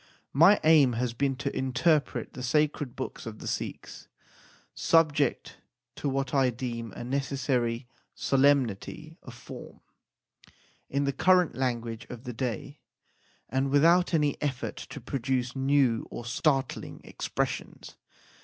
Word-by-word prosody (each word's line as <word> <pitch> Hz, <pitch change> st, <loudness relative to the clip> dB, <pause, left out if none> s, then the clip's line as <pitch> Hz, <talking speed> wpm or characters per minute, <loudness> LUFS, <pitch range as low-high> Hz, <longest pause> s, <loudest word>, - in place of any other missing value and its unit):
My 165 Hz, +9 st, +6 dB
aim 150 Hz, -6 st, +6 dB
has 120 Hz, 0 st, -1 dB
been 135 Hz, +2 st, 0 dB
to 130 Hz, -, -4 dB
interpret 140 Hz, +4 st, +1 dB
the 130 Hz, -, -7 dB
sacred 145 Hz, 0 st, 0 dB
books 130 Hz, -2 st, -6 dB
of 110 Hz, -1 st, -7 dB
the -, -, -10 dB
Sikhs, -, -, -5 dB, 0.7 s
subject 150 Hz, -5 st, +2 dB, 0.4 s
to 145 Hz, -, -2 dB
what 135 Hz, -1 st, -2 dB
I 135 Hz, -2 st, +4 dB
deem 115 Hz, -2 st, -5 dB
a -, -, -7 dB
necessary 130 Hz, -2 st, -1 dB, 0.3 s
solemnity 140 Hz, -, +1 dB
of 130 Hz, -, -11 dB
form, 120 Hz, -, -11 dB, 1.1 s
in 140 Hz, +1 st, 0 dB
the 140 Hz, 0 st, 0 dB
current 180 Hz, 0 st, +4 dB
language 120 Hz, -3 st, -2 dB
of 120 Hz, -1 st, -8 dB
the 125 Hz, -, -6 dB
day, 120 Hz, -2 st, -4 dB, 0.7 s
and 130 Hz, +3 st, 0 dB
without 170 Hz, +6 st, +4 dB
any 150 Hz, -4 st, +1 dB
effort 135 Hz, -4 st, -3 dB
to -, -, -8 dB
produce 125 Hz, 0 st, -2 dB
new 135 Hz, -4 st, +2 dB
or 120 Hz, -, -7 dB
startling 135 Hz, +1 st, -1 dB
expressions. -, -, -4 dB
135 Hz, 125 wpm, -28 LUFS, 120-145 Hz, 1.1 s, My